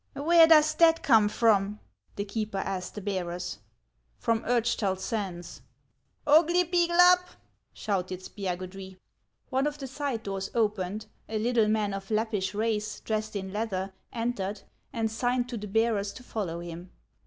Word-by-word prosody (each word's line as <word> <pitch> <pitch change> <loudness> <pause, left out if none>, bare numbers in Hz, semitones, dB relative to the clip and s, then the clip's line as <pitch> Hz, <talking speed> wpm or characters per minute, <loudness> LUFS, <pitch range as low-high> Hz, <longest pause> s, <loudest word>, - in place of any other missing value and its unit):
" - - -43
Where 325 +4 +6
does 310 -1 +6
that 330 -1 +5
come 220 -6 +5
from? 210 -2 +2 0.2
" - - -39
the 200 - -3
keeper 210 0 -3
asked 190 -1 -3
the 210 - -5
bearers. 180 - -3 0.6
"From 230 -1 0
Urchtal 235 -5 +1
Sands." 190 -4 -5 0.3
" - - -45
Oglypiglap! 345 +3 +5 0.3
" - - -46
shouted 185 -3 -3
Spiagudry. 190 0 -6 0.5
One 265 +2 +2
of 295 0 -3
the 275 - -6
side 265 -3 -3
doors 195 -1 -4
opened, 210 -2 -1 0.2
a 220 - -2
little 225 0 +2
man 210 -2 +1
of 195 0 -6
Lappish 215 -3 -1
race, 215 -1 -1
dressed 215 -1 -3
in 190 -1 -4
leather, 195 -3 -2 0.2
entered, 215 -4 -3 0.3
and 225 -3 -1
signed 245 +2 0
to 240 - -4
the 210 0 -6
bearers 210 -1 +1
to 255 - -11
follow 180 -9 -4
him. 175 +1 -8
215 Hz, 155 wpm, -28 LUFS, 195-245 Hz, 0.6 s, Where